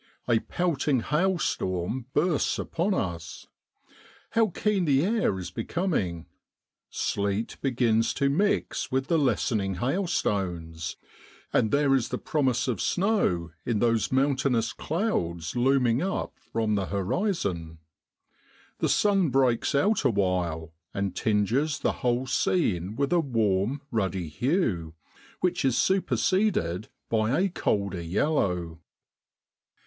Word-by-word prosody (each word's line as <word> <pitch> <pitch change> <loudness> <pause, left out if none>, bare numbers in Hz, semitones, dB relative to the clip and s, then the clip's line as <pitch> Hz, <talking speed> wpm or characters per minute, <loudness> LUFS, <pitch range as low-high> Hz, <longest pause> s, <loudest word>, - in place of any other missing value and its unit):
A 115 -2 +4
pelting 150 -6 0
hailstorm 130 - -1
bursts 155 0 +2
upon 185 +4 -1
us. 85 - -4 0.9
How 225 -1 +3
keen 200 0 0
the 140 +1 +3
air 210 - +1
is 90 - -6
becoming! 115 - -2 0.6
Sleet 100 +2 -1
begins 120 -4 +2
to 140 - +1
mix 195 +9 0
with 130 +1 -1
the 165 - +3
lessening 110 -7 +1
hailstones, 95 - -2 0.6
and 110 - +3
there 140 +1 +3
is 130 -4 +1
the - - -2
promise 135 -6 0
of 120 -7 -1
snow 175 - +1
in 115 - 0
those 115 -1 +1
mountainous 130 -3 +1
clouds 90 - -2
looming 125 -1 +3
up 195 +1 -2 0.2
from 110 -2 0
the 100 -2 0
horizon. 95 - -2 1.0
The - - +1
sun. 195 -5 +3
breaks 130 -1 +2
out 205 +10 +2
awhile, 90 -6 0 0.2
and 100 -1 -2
tinges 115 +8 +1
the - - 0
whole 125 +1 +1
scene 105 - 0
with 140 +5 0
a 175 - +4
warm 115 - 0
ruddy 95 -6 -1
hue, 90 - -1 0.5
which 180 0 +1
is 130 -3 +2
superseded 185 - +1 0.2
by 110 +5 +1
a 195 +1 +2
colder 100 - -1
yellow. 90 - 0
120 Hz, 115 wpm, -27 LUFS, 95-155 Hz, 1.0 s, A